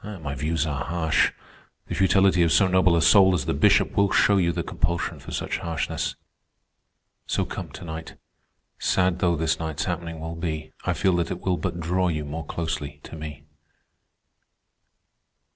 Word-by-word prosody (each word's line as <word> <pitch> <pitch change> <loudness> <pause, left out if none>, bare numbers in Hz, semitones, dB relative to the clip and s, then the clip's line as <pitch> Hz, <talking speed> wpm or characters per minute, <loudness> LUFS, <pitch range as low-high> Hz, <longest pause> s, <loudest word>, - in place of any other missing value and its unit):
My 90 -9 -6
views 75 +3 -1
are 70 -4 -2
harsh; 80 -2 +1 0.6
the - - -4
futility 95 -1 +4
of 85 -1 +3
so 100 - +5
noble 95 -2 +4
a 85 - +2
soul 95 -3 +6
as 75 - -2
the - - 0
Bishop 70 - +3
will 100 -1 +3
show 100 - +4
you 85 -3 +2
the 85 0 -3
compulsion 85 +2 -2
for - - -11
such - - -3
harshness. 85 -1 -3 1.1
So - - 0
come - - -6
to - - -9
night. 80 0 -7 0.6
Sad 90 -1 +1
though 90 -1 +2
this 80 0 0
night's 80 -2 -3
happening 85 -2 -4
will 80 +1 -5
be, 80 -2 -4
I - - +1
feel 95 -2 +2
that 85 - -1
it 90 - -5
will 90 -2 0
but 85 +2 -3
draw 90 +2 0
you 75 -3 -2
more 75 +1 -6
closely 80 -4 -4
to - - -9
me." 75 -2 -8
85 Hz, 175 wpm, -25 LUFS, 80-90 Hz, 1.1 s, soul